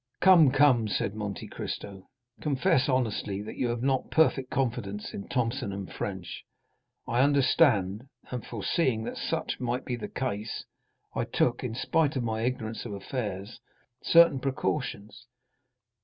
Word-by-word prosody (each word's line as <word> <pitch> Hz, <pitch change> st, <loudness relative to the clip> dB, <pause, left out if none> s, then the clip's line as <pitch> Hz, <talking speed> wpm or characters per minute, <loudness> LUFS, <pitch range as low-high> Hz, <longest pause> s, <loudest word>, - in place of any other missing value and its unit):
"Come, 175 Hz, -6 st, +7 dB
come," 130 Hz, -5 st, +4 dB
said 100 Hz, -1 st, -1 dB
Monte 105 Hz, -2 st, -5 dB
Cristo, 100 Hz, -2 st, -7 dB, 0.3 s
"confess 150 Hz, 0 st, +2 dB
honestly 110 Hz, -6 st, 0 dB
that 110 Hz, -, -7 dB
you 125 Hz, -, 0 dB
have 120 Hz, 0 st, -2 dB
not 135 Hz, -1 st, +1 dB
perfect 135 Hz, -5 st, +3 dB
confidence 115 Hz, -6 st, -2 dB
in 100 Hz, -, -6 dB
Thomson 115 Hz, -5 st, -2 dB
& -, -, -12 dB
French. 95 Hz, -3 st, -5 dB, 0.6 s
I 120 Hz, +2 st, +2 dB
understand, 130 Hz, -, +3 dB, 0.2 s
and 125 Hz, -2 st, -4 dB
foreseeing 115 Hz, -, 0 dB
that -, -, -5 dB
such -, -, -2 dB
might 125 Hz, +1 st, -2 dB
be 125 Hz, -, -2 dB
the 120 Hz, -, -6 dB
case, 110 Hz, -4 st, -3 dB, 0.5 s
I -, -, -1 dB
took, -, -, 0 dB
in 110 Hz, -, -3 dB
spite 150 Hz, +3 st, +1 dB
of 130 Hz, -, 0 dB
my 110 Hz, -1 st, -2 dB
ignorance 115 Hz, -2 st, -2 dB
of 115 Hz, -, -6 dB
affairs, 100 Hz, 0 st, -5 dB, 0.4 s
certain 170 Hz, -5 st, +6 dB
precautions. 130 Hz, -5 st, -3 dB
120 Hz, 140 wpm, -28 LUFS, 105-135 Hz, 0.6 s, Come